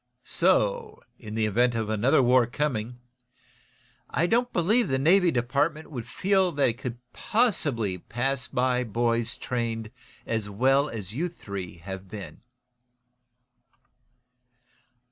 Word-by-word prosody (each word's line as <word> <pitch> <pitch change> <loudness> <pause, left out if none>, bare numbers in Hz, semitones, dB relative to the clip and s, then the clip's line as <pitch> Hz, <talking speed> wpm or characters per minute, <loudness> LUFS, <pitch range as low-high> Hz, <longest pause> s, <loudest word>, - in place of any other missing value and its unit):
So, 480 -3 +1 0.2
in 110 -2 -8
the 110 -1 +1
event 120 +3 +2
of 110 -2 -1
another 120 +5 +3
war 125 -1 +4
coming, 120 -3 -2 1.1
I 165 - +1
don't 240 +6 +1
believe 215 +8 +2
the 130 - +1
Navy 175 +6 +4
Department 145 +5 0
would 120 -6 -6
feel 190 -2 +2
that 140 -3 +3
it 120 +2 -5
could 125 -2 -5 0.2
possibly 145 - 0
pass 130 +6 -2
by 125 0 +1
boys 115 0 0
trained 115 -3 -3 0.3
as 110 -3 -2
well 135 +7 +2
as 105 -3 -6
you 170 +8 -1
three 100 - -7
have 95 -1 -6
been." 100 -1 -9
125 Hz, 125 wpm, -26 LUFS, 115-155 Hz, 1.1 s, war